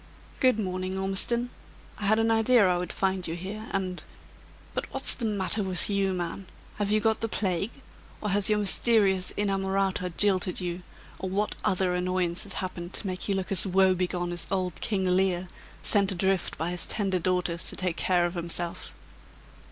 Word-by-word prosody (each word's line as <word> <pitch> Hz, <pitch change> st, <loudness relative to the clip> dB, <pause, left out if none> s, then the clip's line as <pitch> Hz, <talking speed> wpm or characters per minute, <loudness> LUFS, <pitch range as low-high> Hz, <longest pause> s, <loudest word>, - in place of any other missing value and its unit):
"Good 255 Hz, -4 st, +4 dB
morning, 185 Hz, -2 st, -3 dB
Ormiston. 215 Hz, +6 st, +2 dB, 0.5 s
I 210 Hz, -, -3 dB
had 215 Hz, +2 st, +4 dB
an 225 Hz, 0 st, +2 dB
idea 225 Hz, -1 st, +4 dB
I 180 Hz, -, +2 dB
would 175 Hz, -1 st, -3 dB
find 190 Hz, -1 st, -1 dB
you 165 Hz, -, -3 dB
here, 205 Hz, +5 st, -6 dB
and 185 Hz, -2 st, -2 dB, 0.7 s
but -, -, -4 dB
what's -, -, +3 dB
the 240 Hz, -, -3 dB
matter 205 Hz, 0 st, +1 dB
with 190 Hz, +1 st, 0 dB
you, 195 Hz, -1 st, +1 dB
man? 180 Hz, +2 st, -4 dB, 0.3 s
Have 205 Hz, -1 st, -1 dB
you 215 Hz, +1 st, +3 dB
got 220 Hz, +1 st, +1 dB
the 225 Hz, -, -1 dB
plague? 195 Hz, -1 st, 0 dB, 0.5 s
or 210 Hz, -, -3 dB
has 200 Hz, +1 st, +2 dB
your 210 Hz, -, +3 dB
mysterious 200 Hz, -2 st, +3 dB
inamorata 195 Hz, -2 st, 0 dB
jilted 190 Hz, -3 st, +2 dB
you? 175 Hz, -1 st, -4 dB, 0.4 s
or 190 Hz, -, -3 dB
what 205 Hz, +3 st, 0 dB
other 185 Hz, -1 st, +1 dB
annoyance 180 Hz, -1 st, 0 dB
has 200 Hz, -, -6 dB
happened 180 Hz, -1 st, -4 dB
to -, -, +1 dB
make 185 Hz, +1 st, -4 dB
you 200 Hz, -, +2 dB
look 190 Hz, 0 st, -3 dB
as 195 Hz, +1 st, +3 dB
woebegone 185 Hz, -2 st, +2 dB
as 175 Hz, -1 st, -1 dB
old 185 Hz, -3 st, -2 dB
King 195 Hz, -4 st, -1 dB
Lear, 185 Hz, 0 st, +1 dB, 0.4 s
sent 200 Hz, -2 st, +3 dB
adrift 190 Hz, 0 st, 0 dB
by 165 Hz, +2 st, -2 dB
his 180 Hz, -1 st, -2 dB
tender 195 Hz, -4 st, 0 dB
daughters 180 Hz, -1 st, +1 dB
to -, -, -2 dB
take 180 Hz, -2 st, -2 dB
care 180 Hz, -2 st, +2 dB
of 175 Hz, -, -2 dB
himself?" 170 Hz, 0 st, -4 dB
190 Hz, 180 wpm, -27 LUFS, 180-205 Hz, 0.7 s, Good